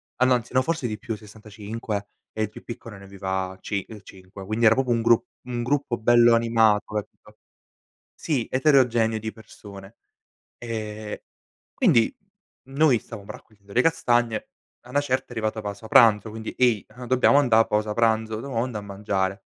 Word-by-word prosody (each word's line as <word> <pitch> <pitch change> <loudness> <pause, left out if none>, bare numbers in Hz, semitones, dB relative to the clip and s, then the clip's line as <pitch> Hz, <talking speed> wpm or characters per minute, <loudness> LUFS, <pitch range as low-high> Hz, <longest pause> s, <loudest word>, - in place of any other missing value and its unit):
Ah 125 - +1
no, 130 - +4
anzi 120 0 -5
no, 130 - +4
forse 165 -3 -2
di 105 - -4
più, 115 -2 -5
65, 105 0 -7 0.2
e 110 - -2
il 105 - -2
più - - -13
piccolo 115 -2 -9
ne 100 - -13
aveva 95 -1 -4
cin 100 0 -3 0.2
5 95 +1 -12
quindi 110 +4 -2
era 110 - +6
proprio 130 -2 0
un 115 -1 +2
grup 115 0 +3 0.2
un 120 -1 -3
gruppo 135 -1 -1
bello 120 +1 +5
animato 115 -2 +2
ecco. - - -14 0.8
Sì 140 -8 -2
eterogeneo 125 -5 +3
di 110 0 -5
persone. 100 -2 -13 0.6
E 110 -2 -6 0.5
quindi, 115 -1 +3 0.5
mhmm, 135 +1 -13
noi 145 -5 +4
stavamo 105 -3 -11
raccogliendo 100 -2 -17
le 120 - +3
castagne, 120 -8 +1 0.3
a 125 - -15
'na 145 - +3
certa 130 -2 -1
è - - -35
arrivata 110 -1 -2
pausa 105 +1 -7
pranzo, 110 -1 +5
quindi: 110 0 -7
"Ehi 120 -5 +2 0.2
dobbiamo 130 +3 +4
andà 120 -6 +4
a 115 - +6
pausa 105 0 0
pranzo, 110 -1 +1
dobbiamo 120 -4 -2
andà 120 -4 -5
a - - -5
mangiare". 100 -1 -3
110 Hz, 170 wpm, -24 LUFS, 105-120 Hz, 0.8 s, era